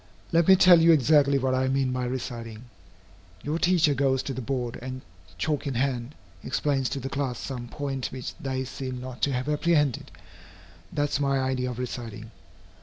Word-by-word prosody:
Let 170 0 +3
me 190 - +9
tell 180 -2 +7
you 165 +1 +6
exactly 145 -1 +4
what 130 -1 0
I 130 0 +1
mean 135 -1 +1
by 125 0 -1
reciting. 120 -3 -5 0.8
Your 155 +3 -2
teacher 175 -5 +3
goes 135 -1 +1
to 135 - -4
the 130 - -5
board 125 -1 -3
and, 130 +1 -6 0.4
chalk 150 - -1
in 135 - -2
hand, 125 +1 -1 0.3
explains 135 -4 0
to 140 - -3
the 135 - -5
class 135 -3 -2
some 125 -2 -6
point 135 0 -3
which 130 -2 -6
they 130 -4 -2
seem 130 -1 -5
not 125 0 -8
to 140 - +1
have 125 +2 -2
apprehended. 150 -3 +1 0.8
That 145 0 0
is - - 0
my 140 -1 +1
idea 130 -1 -1
of 125 - -6
reciting. 115 -3 -6
130 Hz, 180 wpm, -26 LUFS, 125-145 Hz, 0.8 s, me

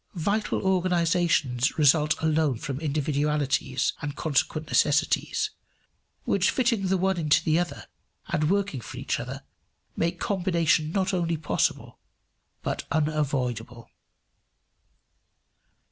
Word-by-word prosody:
Vital 205 +7 -1
organizations 170 -8 +1
result 150 0 +4
alone 155 -5 +2
from 135 +3 -5
individualities 145 -2 0
and 145 -2 -4
consequent 155 0 0
necessities, 430 -1 +1 0.7
which - - +2
fitting 230 -6 +1
the 190 +1 +2
one 190 +1 +1
into 155 -2 +3
the 160 +1 +2
other, 175 0 -4 0.4
and 150 0 +1
working 195 -9 0
for - - -9
each - - -2
other, - - -6 0.5
make 170 +1 -1
combination 170 -5 +1
not 190 +1 0
only 170 -2 0
possible 150 -1 -1 0.6
but - - -2
unavoidable. 135 -7 -2
155 Hz, 105 wpm, -26 LUFS, 145-180 Hz, 0.7 s, result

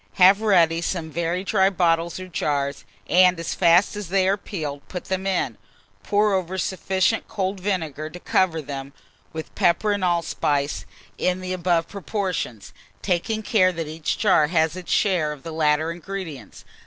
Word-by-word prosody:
Have 195 +2 +6
ready 170 -6 +3
some 165 -2 -3
very 170 +3 -1
dry 195 -1 +3
bottles 170 -2 +1
or 185 - -7
jars, 140 -5 -2 0.2
and 180 -1 +5
as 165 - -3
fast 175 +3 +4
as 205 -4 -6
they 190 0 +2
are 195 - +3
peeled, 150 -8 -6
put 180 - -6
them 190 0 -2
in. 175 - -1 0.4
Pour 205 - +2
over 190 -1 -1
sufficient 190 +3 0
cold 195 -2 -2
vinegar 160 -6 -2
to 180 - -10
cover 170 -4 +1
them, 135 -1 -7 0.4
with 160 0 -7
pepper 205 +5 +2
and 205 -2 -1
allspice 160 -5 0 0.3
in 180 0 +1
the 185 0 -4
above 175 -2 +1
proportions, 185 - -4 0.3
taking 215 +5 -1
care 190 -4 +3
that 165 -3 -5
each 155 0 -3
jar 185 -8 +4
has 160 -1 +1
its 185 -1 -7
share 180 -7 +2
of 145 -3 -9
the 165 - -6
latter 155 0 +1
ingredients. 170 - -8
175 Hz, 165 wpm, -23 LUFS, 160-190 Hz, 0.4 s, Have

